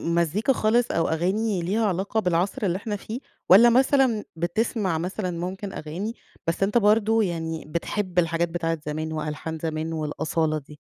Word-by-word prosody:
مزيكا 170 - +2
خالص 235 +1 +2
أو 165 - +1
أغاني 190 +4 0
ليها 205 +6 0
علاقة 195 +3 0
بالعصر 180 +3 0
اللي 180 -1 +1
إحنا 210 +1 -4
فيه، 220 +4 -6 0.3
والّا 220 +6 +9
مثلًا 255 -3 +3
بتسمع 185 +2 0
مثلًا 180 +3 -3
ممكن 185 +3 -5
أغاني، 175 +9 -4 0.3
بس 165 +3 0
أنت 205 +4 +2
برضه 220 +1 +4
يعني 165 -3 -3
بتحب 180 +3 -1
الحاجات 165 0 +1
بتاعة 165 -1 -1
زمان 155 +1 -3
وألحان 155 +1 -4
زمان 160 0 -3
والأصالة 155 0 -1
دي؟ 150 0 -11
180 Hz, 155 wpm, -25 LUFS, 165-215 Hz, 0.3 s, والّا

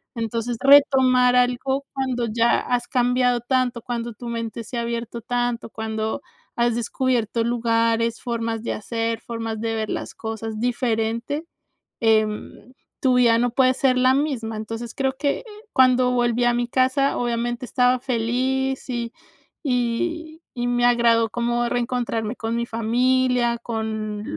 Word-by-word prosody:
Entonces, 230 +1 -2
retomar 265 -3 +5
algo 255 +3 +1
cuando 260 -3 -1
ya 230 +1 +3
has 245 -1 -1
cambiado 245 -1 +2
tanto, 250 -1 0
cuando 235 0 -4
tu 240 +3 -9
mente 230 0 -4
se 235 +3 -6
ha - - 0
abierto 235 0 -4
tanto, 245 0 -2
cuando 220 +3 -3 0.3
has 235 -1 +1
descubierto 235 -1 0
lugares, 230 -1 +1
formas 230 -2 -2
de - - -2
hacer, 230 +1 -3
formas 225 -1 -5
de 225 0 -2
ver 215 -1 -2
las - - -4
cosas 220 -1 -5
diferente, 235 +4 -1 0.6
em, 215 +1 0 0.3
tu 260 -2 +3
vida 235 -2 +5
no 240 +1 +1
puede 255 +1 +3
ser 255 -1 +2
la 255 +1 +4
misma. 260 -6 -1
Entonces, 225 +2 -6
creo 265 -1 0
que, 285 - 0
eh, - - -15 0.3
cuando 255 -1 +4
volví 240 -1 +1
a 240 0 +3
mi 240 0 -1
casa, 260 +2 +2
obviamente, 240 +1 -2
estaba 250 +1 +2
feliz, 260 +2 -1
y 235 -2 -3 0.5
y 310 +6 -2 0.2
y 240 - -1
me 245 0 +2
agradó 235 -2 +3
como 240 +1 0
reencontrarme 240 -2 -2
con 225 0 -3
mi 235 - 0
familia, 240 +1 +1
con 220 -2 -4
240 Hz, 145 wpm, -23 LUFS, 230-255 Hz, 0.6 s, retomar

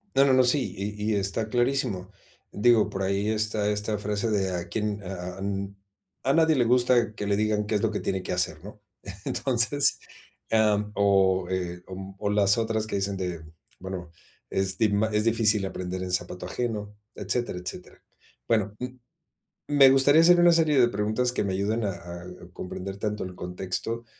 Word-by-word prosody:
No, 135 - +6
no, 135 - +4
no, 130 0 +5
sí, 130 +2 +2
y 105 +2 -3
y - - +1
está 100 +3 -2
clarísimo. 120 -6 0 0.4
Digo, 115 +1 +3
por 95 - -4
ahí 100 +2 0
está 110 -1 0
esta 105 0 -2
frase 105 +2 -2
de 95 -3 0
a 85 0 -4
quién 105 +1 -3
a 90 -1 -6
a - - -11
n 100 0 -3 0.5
"A 135 - +2
nadie 160 -1 +4
le 125 - +3
gusta 120 -2 +3
que 105 - -5
le 100 - +1
digan 105 0 0
qué 110 - -2
es 105 - +1
lo 110 - +1
que 105 - -3
tiene 95 -1 -2
que - - -4
hacer", 90 -3 -1
¿no? 105 +1 -11 0.4
Entonces, 135 +2 +2 0.5
am, 105 -1 +2
o, 95 -2 +3
eh, 90 -1 -3
o 95 +1 -8
o 100 - -1
las 100 0 +4
otras 110 -1 -1
que 110 - -3
dicen 100 0 -1
de, 90 -3 -4 0.4
bueno, 90 -2 -7 0.4
es 95 0 -1
di 110 -2 +3
ma 105 +2 +1
"Es 105 0 +1
difícil 110 -3 +3
aprender 95 0 -5
en 90 - -4
zapato 90 0 -2
ajeno", 105 0 -4 0.2
etcétera, 105 0 -2
etcétera. 90 - -9 0.5
Bueno, 105 -2 +1
m 125 0 -6 0.7
me 140 -2 +6
gustaría 135 +4 +5
hacer 175 +1 +6
una 175 0 +6
serie 155 -4 +3
de 120 - +5
preguntas 110 +4 0
que 125 - -1
me 95 -1 -2
ayuden 105 +4 -1
a 100 - 0
a 85 0 -9 0.3
comprender 95 +2 -6
tanto 105 -1 -3
el 95 - -7
contexto 95 +6 -4
105 Hz, 190 wpm, -26 LUFS, 95-115 Hz, 0.7 s, No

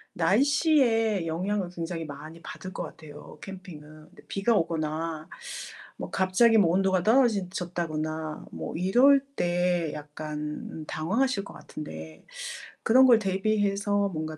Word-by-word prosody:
날씨에 225 - +3
영향을 185 +3 -1
굉장히 165 -1 -4
많이 155 +3 -9
받을 185 - -8
것 - - -4
같아요, 155 -2 -11
캠핑은. 185 -5 -9 0.3
근데 - - -17
비가 210 +3 +1
오거나 160 -2 -1 0.7
뭐 - - -6
갑자기 195 +5 +4
뭐 175 -5 +4
온도가 190 0 +2
떨어지 220 -4 +3
졌다거나 160 -3 -4
뭐 - - -6
이럴 245 +10 +5
때 175 - +1
약간 150 +1 -6
당황하실 200 +7 0
것 - - -11
같은데 80 - -9 0.6
그런 255 +4 +6
걸 240 -3 +8
대비해서 205 0 +1
뭔가 155 -2 -5
180 Hz, 270 characters per minute, -27 LUFS, 155-205 Hz, 0.7 s, 걸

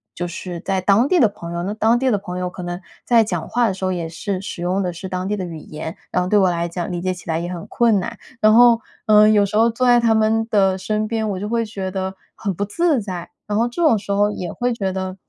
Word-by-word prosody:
就 175 0 -3
是 175 0 -6
在 195 -1 -1
当 200 +7 +3
地 360 +3 +3
的 225 - +6
朋 170 -4 -8
友， 170 - -3
那 200 +3 -2
当 220 +2 +2
地 260 -1 +1
的 205 - +2
朋 180 -2 -6
友 180 0 -2
可 180 - -9
能 175 0 -4 0.3
在 235 -2 +5
讲 215 - -3
话 240 -1 +2
的 195 - 0
时 190 0 -9
候 185 - 0
也 170 -2 -3
是 185 +4 -4
使 190 -3 -7
用 185 +2 0
的 180 - -1
是 175 +3 -7
当 185 0 -3
地 210 - 0
的 185 - -3
语 165 -2 -7
言， 155 +2 -7 0.2
然 180 - +1
后 180 - -3
对 210 - +4
我 190 -2 +4
来 170 0 -1
讲 175 +1 -4
理 175 -1 -3
解 185 +1 -1
起 180 -2 -13
来 160 0 0
也 175 +1 -4
很 175 -2 -6
困 230 -4 +2
难。 - - -6 0.2
然 215 0 +6
后， 235 0 +7 0.3
呃， 215 0 +7
有 210 -2 +4
时 205 +2 -2
候 230 +1 +5
坐 250 +2 0
在 240 0 +6
他 230 -1 +3
们 220 +1 +2
的 195 -2 +3
身 215 +2 -2
边， 220 -1 -1
我 190 -2 -3
就 205 - -4
会 230 -1 0
觉 195 -3 -5
得 190 0 -3 0.2
很 200 -3 -3
不 200 - -3
自 310 - +1
在， 180 -4 -6 0.2
然 205 0 -1
后 230 +2 +2
这 295 +8 -5
种 310 -9 +5
时 200 0 -6
候 205 +1 +3
也 180 -4 -5
会 245 0 -1
觉 195 -4 -2
得 190 0 -4
200 Hz, 310 characters per minute, -20 LUFS, 180-220 Hz, 0.3 s, 后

